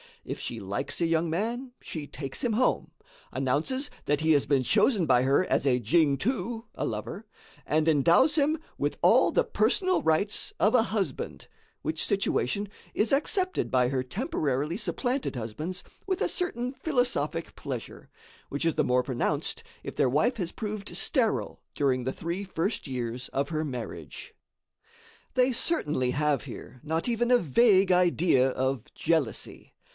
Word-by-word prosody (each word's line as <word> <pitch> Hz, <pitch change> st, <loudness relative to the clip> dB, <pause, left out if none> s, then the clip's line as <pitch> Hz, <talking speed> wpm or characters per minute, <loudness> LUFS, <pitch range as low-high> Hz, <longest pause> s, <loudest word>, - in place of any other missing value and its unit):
If -, -, -5 dB
she -, -, -5 dB
likes 100 Hz, +1 st, -2 dB
a -, -, +4 dB
young 165 Hz, 0 st, +1 dB
man, 235 Hz, +8 st, -2 dB
she 155 Hz, -3 st, -6 dB
takes 135 Hz, -2 st, -6 dB
him 240 Hz, -3 st, +1 dB
home, 250 Hz, +4 st, +1 dB, 0.4 s
announces 150 Hz, -, 0 dB, 0.2 s
that 145 Hz, +1 st, +1 dB
he 160 Hz, 0 st, +3 dB
has 145 Hz, -3 st, +4 dB
been 140 Hz, -2 st, +3 dB
chosen 195 Hz, -, +3 dB
by 125 Hz, -4 st, +4 dB
her 140 Hz, +7 st, +3 dB
as -, -, +1 dB
a 125 Hz, -2 st, +3 dB
"jingtuh" 180 Hz, -, +1 dB
(a -, -, -2 dB
lover), 110 Hz, -, -5 dB, 0.4 s
and 155 Hz, +1 st, +2 dB
endows 165 Hz, -, +5 dB
him 305 Hz, +1 st, +2 dB, 0.2 s
with -, -, -1 dB
all -, -, +5 dB
the -, -, +3 dB
personal 370 Hz, -1 st, +1 dB
rights 160 Hz, +7 st, +1 dB
of 210 Hz, +6 st, +3 dB
a 235 Hz, -, +5 dB
husband, 200 Hz, -, -3 dB, 0.4 s
which 160 Hz, 0 st, -1 dB
situation 200 Hz, +1 st, 0 dB, 0.3 s
is 215 Hz, -, +1 dB
accepted 370 Hz, +7 st, +1 dB
by 125 Hz, -1 st, +3 dB
her 130 Hz, -1 st, -1 dB
temporarily 155 Hz, -, -2 dB
supplanted 245 Hz, -, -1 dB
husbands 150 Hz, +11 st, -5 dB, 0.2 s
with 375 Hz, -2 st, -1 dB
a -, -, +2 dB
certain 255 Hz, -8 st, -2 dB
philosophic 245 Hz, -, -1 dB
pleasure, 130 Hz, -6 st, -7 dB, 0.4 s
which 145 Hz, +4 st, -2 dB
is 165 Hz, -, +2 dB
the -, -, +2 dB
more 125 Hz, 0 st, +3 dB
pronounced 125 Hz, -2 st, -1 dB, 0.2 s
if -, -, -6 dB
their 130 Hz, -, +3 dB
wife 210 Hz, -, +2 dB
has 175 Hz, -5 st, -2 dB
proved 210 Hz, -4 st, -5 dB
sterile 225 Hz, -, 0 dB
during 130 Hz, -3 st, +1 dB
the 130 Hz, +2 st, -2 dB
three 170 Hz, +4 st, -4 dB
first 190 Hz, 0 st, -2 dB
years 125 Hz, -1 st, -4 dB
of 140 Hz, +1 st, -1 dB
her 155 Hz, -1 st, -1 dB
marriage. 125 Hz, -5 st, -7 dB, 1.0 s
They 255 Hz, 0 st, +3 dB
certainly 155 Hz, -, +1 dB
have 145 Hz, -3 st, +1 dB
here 130 Hz, -, -9 dB
not 160 Hz, +8 st, -1 dB
even 240 Hz, 0 st, +1 dB
a 250 Hz, -, +7 dB
vague 195 Hz, -, +4 dB
idea 175 Hz, -7 st, +4 dB
of 130 Hz, -2 st, -1 dB
jealousy. 160 Hz, -8 st, -2 dB
165 Hz, 155 wpm, -28 LUFS, 135-230 Hz, 1.0 s, a